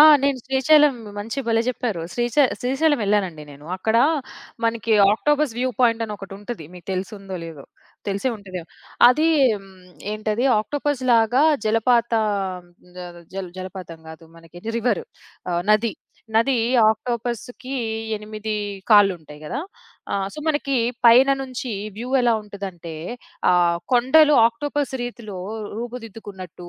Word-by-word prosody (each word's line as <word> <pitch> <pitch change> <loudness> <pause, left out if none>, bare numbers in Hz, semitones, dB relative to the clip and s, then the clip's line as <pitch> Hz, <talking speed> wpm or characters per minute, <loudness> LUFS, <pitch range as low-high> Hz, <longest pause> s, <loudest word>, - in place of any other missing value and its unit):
ఆ! - - +11 0.2
నేను 280 -1 +1
శ్రీశైలం 275 +2 +5 0.2
మంచి 225 +6 -5
భలే 225 0 +3
చెప్పారు. 240 -7 -2
శ్రీశై 240 +4 +3 0.2
శ్రీశైలం 285 +4 +1
వెళ్ళానండి 195 -6 0
నేను. 145 +1 -13
అక్కడ 220 +4 0 0.7
మనకి 230 0 0 0.2
ఆక్టోపస్ 295 +4 +1
వ్యూ 255 +1 0
పాయింట్ 230 -2 +3
అని 215 - -6
ఒకటి 195 -1 -10
ఉంటది. 205 -4 -7
మీకు 175 -2 -13
తెల్సుందో 195 0 -5
లేదో! 160 -4 -9 0.4
తెలిసే 200 +6 -1
ఉంటాది. 190 -3 -7 0.5
అదీ 305 +6 +3 0.3
హ్మ్. 195 - -16 0.4
ఏంటది 215 +3 -1
ఆక్టోపస్‌లాగా 255 -1 +2 0.2
జలపాత 230 +2 +2 0.8
జ - - -9 0.4
జల్ 195 -2 -4
జలపాతం 185 -3 -8
కాదు. 160 +1 -11
మనకి 165 +1 -14 0.2
రివరు. 250 - 0 0.5
ఆహ్, 175 0 0
నది. 215 +1 +3 0.4
నది 235 +4 +3 0.3
ఆక్టోపస్‌కి 240 +3 -4 0.4
8 215 +1 -5 0.4
కాళ్ళుంటాయి 180 -8 +3
గదా! 240 - -3 0.5
ఆహ్, 195 -1 0
సో, - - -9
మనకి 290 -3 0 0.3
పైన 255 +4 +7
నుంచి 255 -2 -5 0.2
వ్యూ 240 +3 -5
ఎలా 240 -1 +3
ఉంటదంటే 190 -5 -8 0.6
ఆ - - +5 0.4
కొండలు 295 +5 +5
ఆక్టోపస్ 290 +4 -2
రీతిలో 230 -5 -7 0.4
రూపుదిద్దుకున్నట్టు, 215 -7 -8
225 Hz, 120 wpm, -22 LUFS, 195-255 Hz, 0.8 s, ఆ